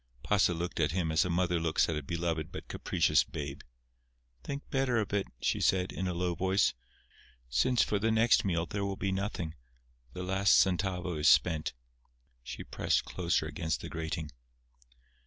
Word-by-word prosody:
Pasa 95 -4 +2
looked 85 +1 -4
at 75 -1 +1
him 85 -3 0
as 80 +2 +3
a - - -2
mother 90 0 +1
looks 80 -1 +2
at 80 - -1
a 75 - -2
beloved 80 +1 -3
but - - -8
capricious - - +2
babe. 70 -1 -6 0.8
"Think 140 - -6
better 135 -3 +1
of 105 -2 -1
it," 100 -1 0
she - - 0
said, 95 -1 +2
in 95 - -3
a 90 - -1
low 90 0 0
voice; 95 +3 +2 0.8
"since 90 - +3
for 105 - 0
the 110 +3 +1
next 115 +1 +4
meal 85 -4 0
there 100 +2 -3
will 100 0 -2
be 95 +1 -1
nothing. 95 -4 -3 0.6
The 90 - -5
last 95 +2 +3
centavo 90 -2 +1
is 75 - +5
spent." 80 -3 +3 0.7
She - - -7
pressed - - 0
closer 85 -2 0
against 80 -1 -3
the - - -7
grating. 80 -1 -4
90 Hz, 175 wpm, -31 LUFS, 80-100 Hz, 0.8 s, is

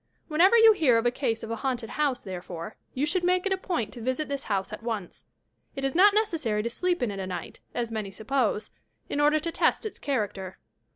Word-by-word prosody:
Whenever 360 +9 +5
you 450 -1 +8
hear 280 - +4
of 230 - 0
a 240 - +4
case 240 -4 -2
of 225 - -5
a 230 - -2
haunted 240 -2 -2
house, 290 -4 0
therefore, 180 0 -7 0.2
you 270 +3 +1
should 355 +4 0
make 365 +1 +2
it 395 - +2
a - - +2
point 345 - -2
to 240 - -8
visit 260 +6 -1
this 280 -1 -3
house 195 -3 -1
at - - -6
once. 220 -5 -5 0.5
It 270 -1 -2
is 270 - 0
not 400 +4 +6
necessary 305 - +1
to 235 - -2
sleep 355 0 0
in 230 - 0
it 195 - -6
a 190 - -3
night, 180 -1 -6 0.2
as 235 -2 -2
many 215 -3 -3
suppose, 220 +2 -1 0.4
in 290 - 0
order 300 +1 +4
to 335 +2 -3
test - - +1
its 435 - -5
character. 200 -8 -3
255 Hz, 230 wpm, -27 LUFS, 220-315 Hz, 0.5 s, you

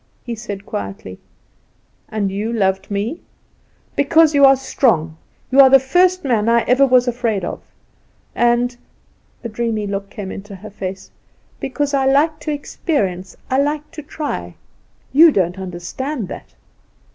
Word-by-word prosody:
He 240 - -5
said, 205 -3 -7
quietly: 95 -1 -6 0.9
"And 205 -3 -2
you 210 +4 -3
loved 190 -4 0
me 210 +10 -3 0.4
" - - -38
"Because 315 +2 +4
you 285 -1 +4
are 270 0 +7
strong. 205 - 0 0.4
You 265 - +3
are 270 -1 +9
the 270 - +8
first 360 +7 +2
man 230 -5 +1
I 235 0 +4
ever 260 +4 +3
was 250 -1 +4
afraid 230 -6 -1
of. - - -5 0.7
And" 240 +1 +1 0.7
a - - -3
dreamy 220 -1 -2
look 200 0 -4
came 200 -2 -7
into 200 0 -8
her 210 +3 -11
face 190 -1 -7 0.5
"because 285 +2 -2
I 270 -1 +2
like 300 +3 +2
to 300 +1 -4
experience, 195 - -3
I 260 - +2
like 295 +1 -1
to 325 -2 -8
try. 300 0 -5 0.6
You 320 +3 +8
don't 185 - 0
understand 190 - -5
that." - - -10
235 Hz, 150 wpm, -19 LUFS, 195-280 Hz, 0.9 s, are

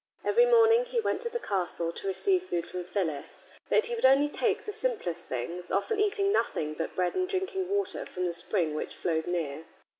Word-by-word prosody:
Every 480 +3 +5
morning 465 0 +5
he - - -1
went - - -1
to 475 - 0
the 475 - -2
castle 180 - -1
to 195 - -6
receive 365 - +2
food 170 - -2
from 180 +1 -5
Phyllis. 165 -7 -3 0.2
But 440 - +3
he 480 - -2
would 465 - -4
only 275 +3 +5
take - - 0
the 420 - -4
simplest 440 - -2
things, 170 +9 -4
often 305 - 0
eating 405 -1 +2
nothing 155 - 0
but 165 +1 -4
bread 180 -1 0
and 370 0 -1
drinking 380 -1 -2
water 405 0 -1
from 180 0 -3
the 175 - -1
spring 170 -3 -1
which 155 - -4
flowed 160 -1 -1
near. 160 -3 -3
230 Hz, 205 wpm, -29 LUFS, -, 0.2 s, Every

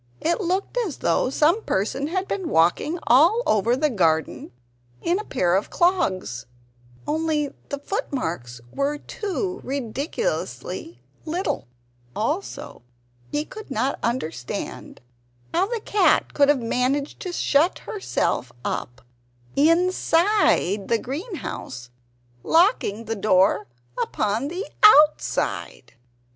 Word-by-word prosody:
It 340 +6 0
looked 380 +6 -1
as 390 - -2
though - - +1
some 310 +10 +3
person 265 - -1
had 375 +4 -2
been 375 -5 -3
walking 175 - +2
all 335 - +5
over 220 +3 +2
the 295 +2 +1
garden 160 -7 0 0.5
in 350 +3 0
a - - -4
pair 180 - 0
of 195 - 0
clogs 190 - 0 0.6
only 305 -1 -1 0.2
the 285 - -2
footmarks 170 - -4
were 280 +1 0
too 385 +2 -4
ridiculously 280 - -4 0.2
little! 350 - -2 0.5
Also 300 - -3 0.5
he 295 +1 -1
could 435 +1 -10
not 265 +2 -1
understand 165 - -4 0.5
how 365 +3 +2
the 470 +1 -2
cat 400 -5 +2
could 285 -1 +4
have 275 -5 +3
managed 260 +5 -1
to 365 - -5
shut 325 0 +2
herself 255 - -2
up 120 +1 -4 0.5
INSIDE 330 - +3
the 230 - +2
greenhouse, 260 - -6 0.5
locking 320 - +2
the 225 +1 -2
door 190 -7 +3 0.3
upon 215 +6 -1
the 360 +7 -4 0.2
OUTSIDE. 300 - +4
290 Hz, 110 wpm, -23 LUFS, 220-360 Hz, 0.6 s, all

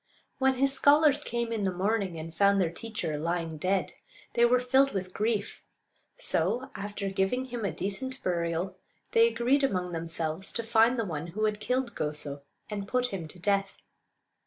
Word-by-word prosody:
When 265 0 +3
his 270 +1 +3
scholars 290 +1 +5
came 235 -2 -2
in 220 -3 -1
the 190 - +1
morning 190 -1 -1
and 160 +1 -7
found 200 +3 +4
their 175 -4 +1
teacher 170 -7 -4
lying 165 -1 -2
dead, 190 +3 0 0.4
they 235 0 +5
were 250 +1 +4
filled 265 +2 +3
with 185 -2 -4
grief; 215 -1 -1 0.6
so, 230 +11 0
after 200 0 -4
giving 195 +7 0
him 240 -3 -5
a 200 - 0
decent 260 +7 -3
burial, 175 +1 -1 0.3
they 230 0 +6
agreed 240 +5 +2
among 180 -8 0
themselves 165 +1 -2
to 230 - -2
find 225 +2 +4
the 225 - 0
one 160 -3 -4
who 215 +6 -1
had 210 -1 0
killed 250 +2 -1
Goso, 150 -2 -3 0.3
and 200 -2 -5
put 250 +2 +1
him 175 -5 -4
to 170 - -11
death. 195 +2 0
200 Hz, 175 wpm, -29 LUFS, 175-240 Hz, 0.6 s, they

